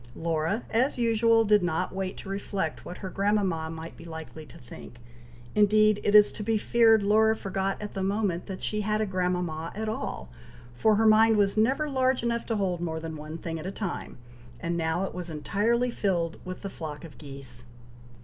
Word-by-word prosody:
Laura, 165 +6 -1
as 250 +5 +2
usual, 230 -1 +3
did 210 -1 +5
not 175 +1 -1
wait 190 0 -3
to - - -9
reflect 195 -4 -3
what 175 - -8
her - - -3
grandmama 195 -6 0
might 160 +1 -8
be 165 - -12
likely 160 -1 -9
to 125 - -14
think; 120 0 -12 0.6
indeed 215 0 +4
it 205 - +2
is 210 -1 +8
to - - -8
be 220 +1 +1
feared 225 -1 +4
Laura 220 +2 +4
forgot 195 -1 -2
at 210 0 -6
the 195 - -3
moment 195 -3 -1
that 190 -2 -6
she 210 0 -1
had 215 +1 0
a 215 - +1
grandmama 180 -4 -2
at 220 +1 -3
all, 220 - -4 0.5
for 215 - +3
her 225 +2 +2
mind 220 0 +6
was 200 -1 +2
never 265 +8 +2
large 260 -3 +1
enough 235 0 -1
to 225 - 0
hold 185 -4 -1
more 160 -2 -2
than 160 0 -6
one 155 +1 -7
thing 165 0 -5
at 160 - -6
a - - -3
time, 195 -2 -5 0.4
and 170 +5 -2
now 165 +2 0
it 195 - -4
was 180 -1 -6
entirely 220 +10 0
filled 175 -7 -1
with 185 +2 -7
the 200 - -3
flock 150 -4 -7
of 160 - -13
geese. 135 -4 -8
195 Hz, 200 wpm, -27 LUFS, 165-215 Hz, 0.6 s, is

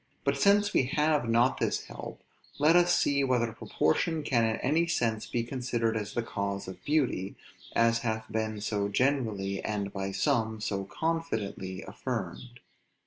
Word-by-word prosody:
But 140 0 +1
since 205 +7 +4
we 130 - +3
have 150 -5 +2
not 120 +3 +3
this - - 0
help, - - -9 0.3
let 150 +4 +5
us 175 0 +5
see 140 -1 +2
whether 120 -4 +1
proportion 155 - 0
can 120 -5 +2
in 110 0 +1
any 160 +8 +1
sense 115 -9 0
be 120 - -1
considered 120 -2 -1
as 105 -2 -4
the 120 - 0
cause 100 -3 -3
of 95 - -9
beauty, 130 -11 0 0.4
as 115 0 +4
hath 110 -2 -2
been 110 -1 -2
so 100 -1 -1
generally, 105 -5 0
and, 100 -2 -2
by 95 0 -3
some, 110 +2 0
so 100 -2 -2
confidently 105 - -3
affirmed. 120 +1 -5
115 Hz, 155 wpm, -29 LUFS, 105-140 Hz, 0.4 s, let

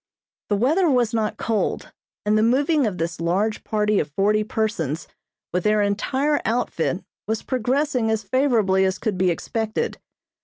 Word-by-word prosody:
The 205 - +2
weather 310 - +3
was 245 -4 +2
not 220 -2 -1
cold, 220 -3 -1 0.3
and 210 +1 +3
the 215 - +4
moving 275 +4 +3
of 190 -4 -3
this 165 0 -3
large 195 +6 0
party 210 -1 +1
of 145 - -2
forty 205 +7 +2
persons 170 -9 -2 0.5
with 180 0 0
their 210 0 +3
entire 265 +9 0
outfit 220 -6 -1 0.2
was 220 0 -1
progressing 255 -1 0
as 220 -1 0
favorably 225 -8 +2
as 190 0 +1
could 215 -4 -2
be 185 0 +2
expected. 220 +6 -2
215 Hz, 155 wpm, -23 LUFS, 195-245 Hz, 0.5 s, the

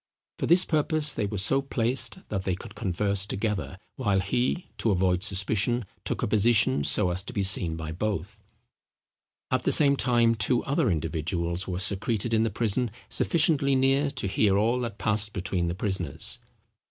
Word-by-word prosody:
For - - -1
this 175 +3 +5
purpose 155 -1 0
they 105 - -2
were 105 0 -4
so 135 +8 +1
placed, 135 +6 -1
that 95 -3 -3
they 95 -2 -1
could 105 +3 -11
converse 100 -1 -1
together, 105 -2 -3 0.2
while 105 -7 +1
he, 120 - -1
to 115 - 0
avoid 90 -2 +1
suspicion, 105 +4 +1 0.2
took - - -3
a - - +1
position 105 - +3
so 90 +5 +1
as 90 +1 -1
to 95 - -8
be 100 - -1
seen 90 -4 +4
by 80 -1 -6
both. 100 +4 -4 1.1
At 130 -1 +1
the - - 0
same 140 -2 +5
time 120 -3 +2
two 120 +2 +1
other 140 -2 0
individuals 85 +2 -2
were 90 -2 -3
secreted 100 +4 0
in 110 - +3
the 115 - +1
prison 115 +3 0 0.2
sufficiently 150 -4 +1
near 135 +2 +2
to 130 -6 -5
hear 100 0 +2
all 115 +4 +1
that 115 -4 -5
passed 105 -1 0
between 90 -2 -2
the 85 - -3
prisoners. 95 -7 -2
105 Hz, 175 wpm, -26 LUFS, 95-125 Hz, 1.1 s, this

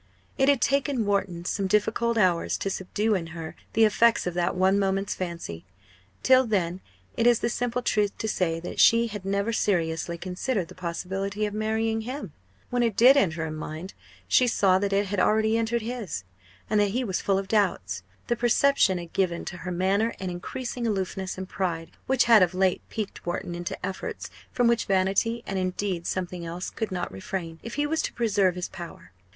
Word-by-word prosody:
It 270 0 +3
had 280 -3 +3
taken 275 -4 +1
Wharton 190 -4 -1
some 195 +1 -1
difficult 220 +3 +1
hours 180 -5 +2
to 195 - -2
subdue 210 +4 -1
in 175 -4 -1
her 160 -1 -6 0.2
the 225 0 +5
effects 230 +2 +3
of 180 - -2
that 175 +1 0
one 190 +2 +3
moment's 195 0 0
fancy. 170 - -5 0.6
Till 260 -1 +5
then 185 -4 0 0.3
it 230 - +2
is 240 -1 +6
the 235 - +1
simple 245 +1 -2
truth 210 -3 +1
to 220 - -3
say 170 -6 0
that 175 - -6
she 230 +1 +6
had 210 -4 -6
never 200 +3 0
seriously 170 -4 0
considered 185 +2 -2
the - - -10
possibility 190 +4 -3
of 205 - -3
marrying 220 +1 0
him. 245 - -6 0.4
When 245 - +1
it 230 -4 +1
did 255 +4 +8
enter 165 - +1
her 160 - -4
mind, 155 +4 -6 0.3
she 250 - +4
saw 190 -5 +3
that 200 0 -1
it 200 +1 +2
had 200 0 -2
already 220 +3 +3
entered 230 0 0
his 220 - -4 0.4
and 210 0 +2
that 205 -1 +3
he 255 - 0
was 190 -6 -2
full 195 -1 +2
of 195 0 -3
doubts! 170 - 0 0.2
The 240 - 0
perception 240 -4 +3
had 170 -1 -8
given 175 -3 0
to 175 - -6
her 180 +1 -5
manner 195 +6 +1
an 185 -1 -3
increasing 235 +7 -4
aloofness 190 -2 -2
and 190 0 -5
pride 170 -4 -3 0.2
which 265 -1 +4
had 230 -3 +7
of 180 0 +3
late 185 -1 +2
piqued 215 -3 -5
Wharton 175 0 -3
into 175 0 -4
efforts 190 0 -5 0.2
from 245 - +1
which 235 -1 +2
vanity, 195 +5 +1
and, 195 -1 -2
indeed, 185 -1 -2
something 180 -1 -3
else, 170 +2 -5
could 220 -3 -4
not 180 -1 -3
refrain, 165 - -5
if 235 - -7
he 290 - +1
was 315 +2 0
to - - -3
preserve 205 -6 +2
his 180 -1 -3
power. 165 - -10
195 Hz, 195 wpm, -26 LUFS, 180-225 Hz, 0.6 s, did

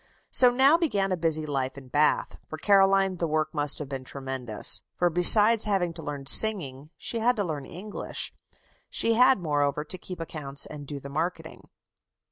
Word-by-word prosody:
So 250 - +5
now 270 +6 +3
began 200 - -1
a - - 0
busy 160 -2 -2
life 135 -2 -4
in 135 -2 -12
Bath. 150 +4 0
For 155 - -8
Caroline 195 0 +2
the 170 - -3
work 155 +1 -2
must 145 -2 +3
have 150 - -7
been 135 -1 -7
tremendous. 130 -5 -3
For, 175 -1 0
besides 210 +6 +6
having 190 -5 -1
to 165 - -9
learn 145 -2 -7
singing, 150 -7 +3
she 230 - -3
had 245 +2 +1
to 205 - -2
learn 150 -6 -6
English. 200 +4 -7 0.6
She 230 - +2
had, 255 +3 +4
moreover, 145 -4 -2
to 185 +4 -1
keep 180 0 -10
accounts 145 -4 -5
and 145 -2 -11
do 145 0 -7
the 140 - -11
marketing. 160 +5 -6
165 Hz, 180 wpm, -25 LUFS, 145-200 Hz, 0.6 s, besides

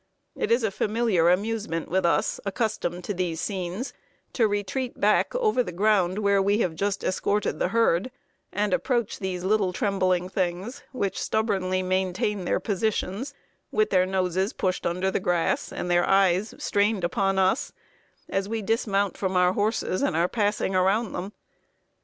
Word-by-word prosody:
It - - -2
is 235 +1 +3
a 220 - +1
familiar 210 -5 +2
amusement 200 -3 -1
with 185 0 +1
us, 170 - +1
accustomed 195 -4 -2
to 205 - -3
these 175 -3 -2
scenes, 190 +5 -3 0.4
to 230 -3 +3
retreat 205 +5 -3
back - - +2
over 435 - +2
the 205 - -4
ground 190 -1 +2
where 200 -2 +3
we 200 +2 +2
have 180 -7 0
just 200 +4 -2
escorted 205 +2 0
the - - +2
herd, 230 -2 +2 0.4
and 205 -2 0
approach 240 -2 0
these 185 -2 -3
little 195 -1 +2
trembling 185 -2 0
things, 185 +5 -3
which 200 -7 -2
stubbornly 190 -4 0
maintain 185 +1 -1
their - - +1
positions, 220 +5 -2 0.4
with 430 0 +1
their 185 0 +3
noses 190 +2 0
pushed 185 -1 -1
under 180 +3 0
the - - 0
grass 175 -2 0
and 180 - -3
their 175 0 +3
eyes 195 +1 +3
strained 205 -1 +1
upon 195 +3 +1
us, 190 +6 +2 0.6
us 195 0 0
we 225 0 -3
dismount 200 -3 0
from 190 -1 -2
our 180 0 +4
horses 205 -2 0
and - - +1
are 170 +2 +3
passing 205 -2 0
around 195 +4 +2
them. 185 +3 -4
195 Hz, 160 wpm, -26 LUFS, 185-215 Hz, 0.6 s, our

